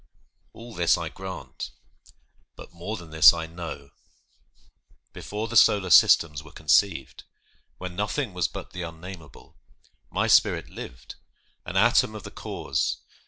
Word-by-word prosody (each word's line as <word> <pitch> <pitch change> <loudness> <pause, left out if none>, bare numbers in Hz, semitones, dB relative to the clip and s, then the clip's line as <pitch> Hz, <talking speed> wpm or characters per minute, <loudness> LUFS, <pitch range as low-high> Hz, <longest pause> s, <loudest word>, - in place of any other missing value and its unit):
All 115 0 -12
this 85 -3 +2
I 85 -2 -4
grant, 95 -8 -8 0.9
but - - -13
more 90 +6 -6
than 85 -4 -12
this 80 0 +7
I 80 -1 -4
know! 80 -4 -8 1.2
Before 105 +2 -5
the 120 - -7
solar 100 -4 +5
systems 75 -2 +5
were 80 0 -15
conceived, 80 -1 +1 0.5
When 90 +1 -7
nothing 105 +3 -2
was 90 -1 0
but - - -9
the 90 - -7
unnamable, 85 -3 -11 0.5
My - - 0
spirit - - +3
lived, - - -10 0.5
an 90 - -3
atom 120 +2 +3
of 105 - -8
the - - -9
Cause. 65 -1 -3
85 Hz, 135 wpm, -25 LUFS, 80-100 Hz, 1.2 s, this